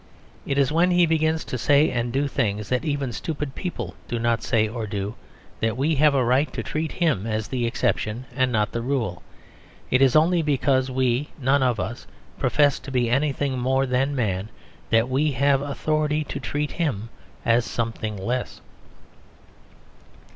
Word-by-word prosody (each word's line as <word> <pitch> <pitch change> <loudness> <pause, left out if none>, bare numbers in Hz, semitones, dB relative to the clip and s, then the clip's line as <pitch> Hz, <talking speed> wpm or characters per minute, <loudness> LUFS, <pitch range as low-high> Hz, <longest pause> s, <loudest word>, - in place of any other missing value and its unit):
It 140 - -1
is 140 0 +3
when 170 +3 +3
he 175 -1 +4
begins 160 0 +1
to 130 - -4
say 145 +5 +4
and 120 0 -1
do 140 +3 0
things 105 -6 -1
that 125 +2 0
even 145 -5 -2
stupid 150 +2 -4
people 180 +3 -5
do 120 - -2
not 115 0 +1
say 110 -3 +2
or 110 0 -4
do, 100 +1 -3 0.5
that 115 +1 0
we 145 +5 +1
have 150 0 +4
a 130 -3 +2
right 130 +5 +2
to - - -3
treat 155 +1 -3
him 150 - 0
as 110 0 -2
the 125 -3 -1
exception 115 +1 -1
and 130 -2 +2
not 105 -2 +1
the 115 - -3
rule. 120 -8 -2 0.7
It 130 - +4
is 135 -2 +5
only 165 +3 +4
because 135 -3 +1
we 130 +2 0
none 135 +1 +2
of 125 -4 +1
us 110 +7 -5 0.3
profess 145 +1 +3
to - - -10
be 120 -2 +1
anything 140 -1 0
more 130 +2 +1
than 135 +2 0
man 105 -4 -1 0.4
that 115 +1 +3
we 140 +3 +1
have 135 +1 +3
authority 150 +2 0
to - - -6
treat 145 0 -2
him 120 - -2 0.4
as 115 +1 +4
something 115 -3 -3
less. 120 +6 -3
130 Hz, 175 wpm, -24 LUFS, 115-145 Hz, 0.7 s, is